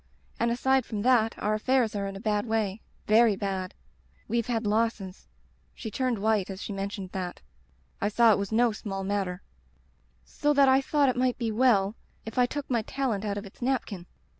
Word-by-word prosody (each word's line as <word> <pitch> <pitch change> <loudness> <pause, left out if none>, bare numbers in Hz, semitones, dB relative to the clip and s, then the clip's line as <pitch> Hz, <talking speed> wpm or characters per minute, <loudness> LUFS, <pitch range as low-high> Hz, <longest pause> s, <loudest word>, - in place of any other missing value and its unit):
And 235 - +2
aside 265 +2 +2
from 210 -3 -4
that 235 -3 +3
our 210 - 0
affairs 230 0 +1
are 200 -1 -2
in 195 - -6
a - - -7
bad 210 +1 -1
way 220 -2 -1
— - - -36
^very 220 -1 +5
bad. 190 -2 -3 0.5
WeVe 235 -1 -1
had 230 -2 -1
losses' 210 -3 -1 0.2
— - - -38
she 220 - -6
turned 255 0 0
white 210 -2 +1
as 190 -1 -6
she 205 - -5
mentioned 195 -1 -5
that. 180 -2 -5 0.6
I 205 - +2
saw 230 +2 +5
it 205 - +3
was 200 0 -3
no 235 +1 +3
small 195 -2 -5
matter 190 -2 -2 0.5
— - - -38 0.4
*so 295 0 +4
that 280 -1 +6
I 265 +1 +5
thought 285 0 +2
it 255 - 0
might 250 0 +1
be 230 -2 -2
well 215 -3 +3 0.3
if 225 +3 -4
I 245 - +5
took 290 +2 -5
my 235 -3 +1
talent 230 -3 -2
out 205 -1 -2
of 205 - -5
its 200 - -14
napkin. 235 -8 -2
220 Hz, 210 wpm, -27 LUFS, 200-245 Hz, 0.6 s, that